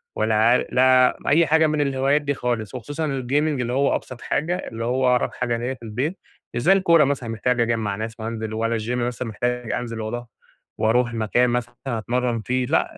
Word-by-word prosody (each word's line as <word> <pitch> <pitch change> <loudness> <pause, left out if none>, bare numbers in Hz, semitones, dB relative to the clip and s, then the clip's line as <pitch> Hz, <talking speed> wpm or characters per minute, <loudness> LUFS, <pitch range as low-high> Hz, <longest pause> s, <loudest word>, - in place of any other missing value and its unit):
ولا 110 0 +1
عار 115 +3 +4
لا 130 0 +4
أي 160 +3 +4
حاجة 160 0 +4
من 150 -1 0
الهوايات 140 +1 +1
دي 145 0 -1
خالص، 120 -4 -3
وخصوصًا 145 +6 -4
الgaming 135 -3 -4 0.3
اللي 120 0 -2
هو 140 +2 +2
أبسط 130 - -7
حاجة، 170 +4 -1
اللي 115 -7 -5
هو 130 +2 +1
أقرب - - 0
حاجة 120 -2 -1
ليّا 120 +3 -3
في 125 - -14
البيت، 130 - -3 0.3
مش 120 - -2
زي 185 +10 +5
الكورة 170 -5 +5
مثلًا 135 -4 -1
محتاج 120 +2 0
أجمّع 115 -3 0
ناس 110 +2 -6
وأنزل 110 0 -4
والّا 115 +1 -1
الجيم 120 +2 -1
مثلًا 125 0 -4
محتاج 120 +2 -2
أنزل 115 -2 -3
وارو 120 +2 -5 0.5
وارُوح 120 +2 +2
مكان 115 +2 +2
مثلًا 120 0 -2
أتمرن 120 0 -1
فيه، 125 +3 -1
لأ 160 - 0
125 Hz, 195 wpm, -23 LUFS, 115-135 Hz, 0.5 s, زي